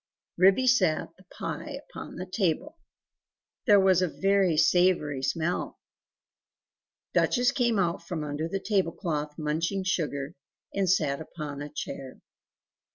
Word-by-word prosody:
Ribby 195 +8 +5
set 185 -10 +2
the 185 - -21
pie - - -6
upon - - -9
the 185 - -5
table; 185 - -1 0.9
there 205 -1 +7
was 190 -2 +4
a 185 - +2
very 195 -1 +2
savoury 165 -5 +3
smell. 165 +5 -1 1.4
Duchess 245 -1 +3
came 240 -5 +1
out 175 -3 0
from 165 -4 -3
under 150 +2 -3
the 195 +3 -2
table 190 -5 0
cloth 150 -5 -3
munching 165 +5 -1
sugar, 150 -5 -2 0.4
and 195 -2 0
sat 150 -5 +1
up - - -8
on 145 -2 -5
a 145 - -5
chair. 135 -3 -7
175 Hz, 135 wpm, -28 LUFS, 150-195 Hz, 1.4 s, there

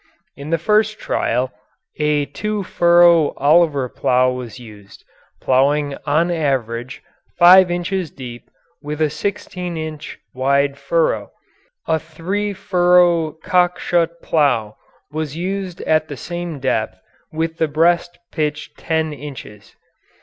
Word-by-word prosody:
In 140 +2 -9
the 165 - +2
first 215 +5 +1
trial, 125 - -1 0.5
a 150 -1 +1
2 210 +5 -4
furrow 170 -3 +4
Oliver 145 -2 +3
plough 125 +1 +1
was 125 -3 -7
used, 105 -4 -14 0.4
ploughing 140 +2 +1
on 160 +4 +2
an - - 0
average 125 -4 -2 0.3
5 180 +1 +7
inches 175 0 -2
deep 120 -3 -10 0.3
with 150 0 -5
a 155 -2 +1
16 180 -2 -4
inch 155 -1 -6 0.2
wide 140 +2 +1
furrow; - - 0 0.6
a 160 - +1
3 185 +7 -3
furrow 180 -4 +3
Cockshutt 175 -2 +1
plough 120 -9 +1 0.4
was 155 -2 -4
also 160 - -7
used 190 -1 -4
at 155 0 +1
the 145 - -7
same 175 -2 -5
depth 110 -7 -1 0.3
with 160 +1 -3
the 160 - +2
breast 170 +3 +1
pitched 150 -1 -3
10 160 -1 -1
inches. 130 -8 -10
160 Hz, 125 wpm, -19 LUFS, 140-175 Hz, 0.6 s, 5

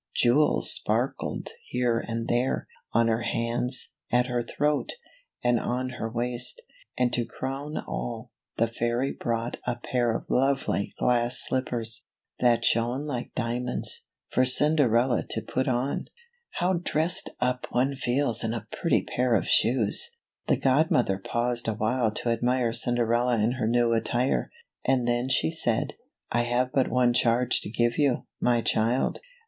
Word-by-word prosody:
Jewels 135 +6 +4
sparkled - - -1 0.2
here 120 -2 0
and 115 0 -4
there 120 +2 0
— - - -44
on 115 0 +3
her 115 0 +1
hands 120 +2 0
— - - -34
at 125 +1 +3
her 125 -1 -1
throat 150 +4 -1 0.3
— - - -40
and 120 -1 +3
on 125 +3 -2
her 115 - -2
waist; 120 +1 -1 0.4
and 125 -1 +1
to 120 - +1
crown 135 +5 -5
all, - - -5 0.3
the 115 - +3
fairy 120 +3 -1
brought 115 0 -3
a 120 - 0
pair 120 0 -1
of 115 - -2
lovely 135 -5 +1
glass 120 0 +2
slippers 120 -4 -2 0.2
— - - -53
that 120 -1 +3
shone 120 +5 +1
like 125 -5 -5
dia 120 -1 -1
monds 125 0 -2 0.2
— - - -65
for 130 - +3
Cinderella 130 -3 +3
to 110 - 0
put 130 +4 -2
on. 130 +2 -1 0.5
H - - -1
ow 185 +1 +3
dressed 175 +5 +1
up 125 0 -1
one 130 +3 +1
feels 125 -2 +1
in 115 +1 -1
a 110 -2 -6
pretty 170 - +1
pair 125 -1 +1
of 95 - 0
shoes! 115 -4 +3 0.4
The - - +3
godmother 130 -7 +2
paused 120 +4 -1
awhile 110 +2 +1
to 120 - -1
admire 120 0 +1
Cinderella 120 0 +1
in 110 +3 +2
her 125 -4 -2
new 120 0 +2
attire, 120 +3 0 0.3
and 130 -2 +1
then 120 +2 0
she 160 - +2
said, 120 -9 0 0.2
" - - -38
I 120 - +2
have 125 +1 0
but 135 -2 +2
one 125 -1 +3
charge 120 +1 +2
to - - -5
give 120 +3 0
you, 140 -4 +1
my 120 -1 +2
child. 115 +4 +1
120 Hz, 165 wpm, -27 LUFS, 115-130 Hz, 0.5 s, Jewels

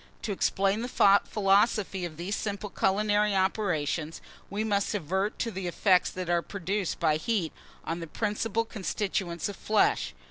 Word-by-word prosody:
To 215 - -2
explain 195 +2 +1
the 245 - -3 0.4
philosophy 200 -2 +2
of 155 -3 -7
these 185 +5 -2
simple 205 -1 -4
culinary 205 +1 +2
operations, 175 -5 0 0.3
we 205 +2 -2
must 205 -1 0
advert 190 +3 -1
to 230 - -2
the 190 -2 -4
effects 180 +1 +3
that 185 -1 -5
are 175 0 +2
produced 195 +1 -3
by 155 -1 +3
heat 195 -3 -1 0.3
on 165 +1 -3
the 165 - -6
principal 220 +4 -1
constituents 190 -4 -2
of 205 - -6
flesh. 65 - +1
195 Hz, 150 wpm, -28 LUFS, 175-210 Hz, 0.4 s, effects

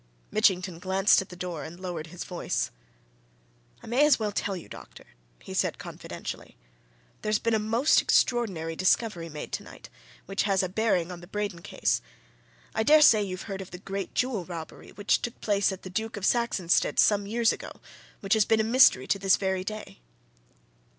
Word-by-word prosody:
Mitchington 185 -5 +2
glanced 190 +3 +3
at 190 - -10
the 180 - -10
door 175 -3 -5
and 165 +2 -9
lowered 175 -4 -5
his 175 +2 -7
voice. 180 - -3 1.1
"I - - -10
may 250 +5 +2
as 300 -2 +5
well 215 -2 -2
tell 195 -1 -2
you, 170 - -10
doctor," - - -12 0.4
he - - -8
said - - 0
confidentially, - - -8 0.6
"there's 215 0 +1
been 230 +1 -1
a 220 - +3
most 230 +7 +3
extraordinary 185 -10 +1
discovery 185 -2 +1
made 150 -1 -7
tonight, - - -8 0.3
which 195 +1 -1
has 195 -2 +1
a 185 - -2
bearing 185 -4 0
on 175 -1 -8
the 175 - -12
Braden 200 -3 -4
case. - - -1 0.7
I - - 0
dare 300 +7 +6
say 220 -6 +7
you've 185 -2 -4
heard 195 -2 -5
of 190 - -9
the 180 - -8
great 195 +1 -6
jewel 250 -7 0
robbery 165 -2 -9
which 205 0 0
took 240 - -5
place 205 -1 +1
at 190 - -8
the 185 - -7
Duke 220 +3 -3
of 195 - -3
Saxonsteade's 220 -8 +1
some 205 -1 +2
years 230 +1 +2
ago, - - -8 0.5
which 195 -2 +1
has 220 -1 +5
been 220 +2 +2
a - - +3
mystery 230 - +5
to 200 - 0
this 195 -1 +4
very 190 -1 -1
day?" 215 - -7
195 Hz, 185 wpm, -27 LUFS, 180-220 Hz, 1.1 s, say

